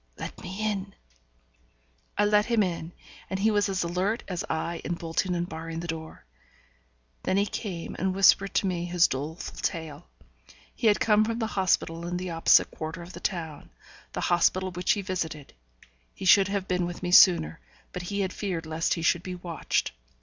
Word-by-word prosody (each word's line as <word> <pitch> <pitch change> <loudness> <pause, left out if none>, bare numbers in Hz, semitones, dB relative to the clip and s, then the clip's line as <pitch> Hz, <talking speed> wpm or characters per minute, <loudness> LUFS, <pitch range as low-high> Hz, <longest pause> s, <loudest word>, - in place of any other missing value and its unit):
'Let - - -7
me 210 +4 -3
in.' 195 -1 -5 1.2
I 205 - +4
let 210 0 +3
him 230 -3 +3
in, 170 -2 -3 0.4
and 190 - -2
he 220 +3 +3
was 205 -1 +2
as 190 -2 0
alert 185 +6 -1
as 180 -3 -3
I 165 +1 -2
in 175 - -2
bolting 170 +2 -1
and 175 0 -1
barring 165 0 -6
the 170 - -5
door. 160 -1 -7 1.0
Then 190 - 0
he 200 - +3
came 185 -5 -5
and 190 +1 0
whispered 195 0 +4
to - - +2
me 175 -2 -1
his 175 0 +4
doleful 150 +6 -5
tale. 160 -1 -4 0.7
He 230 - 0
had 210 - +4
come 215 -1 +4
from 225 +1 -2
the 230 - -1
hospital 170 -3 0
in 175 0 -2
the 180 0 -4
opposite 165 0 +4
quarter 160 +2 -6
of 175 +2 -11
the - - -8
town, 160 -6 -4 0.4
the - - -3
hospital 185 +2 +2
which 180 +1 +1
he 200 - -3
visited; 165 -6 -4 0.6
he - - -7
should 195 +1 +7
have 195 -1 -2
been 180 -1 0
with 175 +1 -7
me 175 - -1
sooner, 170 - +6 0.3
but 180 - -4
he 200 0 -1
had 190 -1 -2
feared 180 -6 -3
lest 160 +1 0
he 165 - -5
should 170 +1 +3
be 185 0 -6
watched. 175 -2 -2
180 Hz, 190 wpm, -27 LUFS, 165-195 Hz, 1.2 s, should